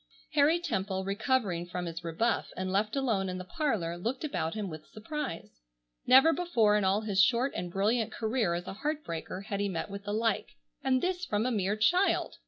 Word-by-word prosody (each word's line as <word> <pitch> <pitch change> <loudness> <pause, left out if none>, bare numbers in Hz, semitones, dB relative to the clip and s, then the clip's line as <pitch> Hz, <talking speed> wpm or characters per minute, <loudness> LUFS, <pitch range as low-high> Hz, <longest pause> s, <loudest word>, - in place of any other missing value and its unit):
Harry 305 +3 +4
Temple, 190 - -2
recovering 200 -4 0
from 180 0 -4
his 165 0 -6
rebuff, 170 +8 0
and 185 0 -2
left 210 +4 0
alone 225 -9 0
in 185 - -3
the 185 - -5
parlor, 185 - -1
looked 240 - -3
about 215 - -2
him 210 -2 -3
with 155 -3 -8
surprise. 220 - -6 0.5
Never 270 +6 +7
before 235 -13 +2
in 210 - +2
all 195 +2 +2
his 200 -3 +2
short 250 +6 +3
and 175 - -3
brilliant 215 +4 +1
career 220 -6 0
as 175 +1 -4
a - - -5
heart 300 +8 -3
breaker 170 +3 -5
had 200 0 -4
he 200 0 0
met 185 +2 -4
with 200 0 -7
the 205 - -3
like, 220 - 0 0.3
and 260 -1 +2
this 360 0 -1
from 215 -8 0
a 255 - +1
mere 205 -2 0
child! 355 - +2
210 Hz, 200 wpm, -30 LUFS, 185-260 Hz, 0.5 s, Never